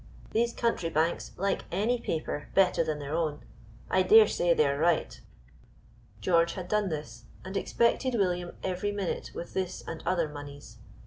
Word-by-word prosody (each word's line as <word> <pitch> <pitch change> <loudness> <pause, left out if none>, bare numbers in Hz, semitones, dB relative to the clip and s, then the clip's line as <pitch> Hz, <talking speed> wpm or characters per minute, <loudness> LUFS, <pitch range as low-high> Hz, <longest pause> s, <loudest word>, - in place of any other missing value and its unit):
These 235 +1 +1
country 230 -8 0
banks 165 +1 0
like 195 +1 -1
any 220 +7 +1
paper 155 -6 -3
better 195 -2 +4
than 155 -1 -2
their 145 0 -5
own. 155 -3 -1 0.5
I 185 - +3
dare 215 +3 +7
say 175 -3 +1
they 155 -2 +4
are 140 0 0
right." 170 +1 +1 1.0
George 170 -2 +3
had 185 -2 -6
done 210 0 +1
this, 120 -7 -6 0.2
and 190 +1 -6
expected 235 +5 +1
William 180 -4 0
every 190 +2 -1
minute 200 -3 -3
with 170 - -7
this 185 -1 -3
and 165 -1 -5
other 175 -3 +1
moneys. 145 -1 -10
175 Hz, 165 wpm, -29 LUFS, 155-200 Hz, 1.0 s, dare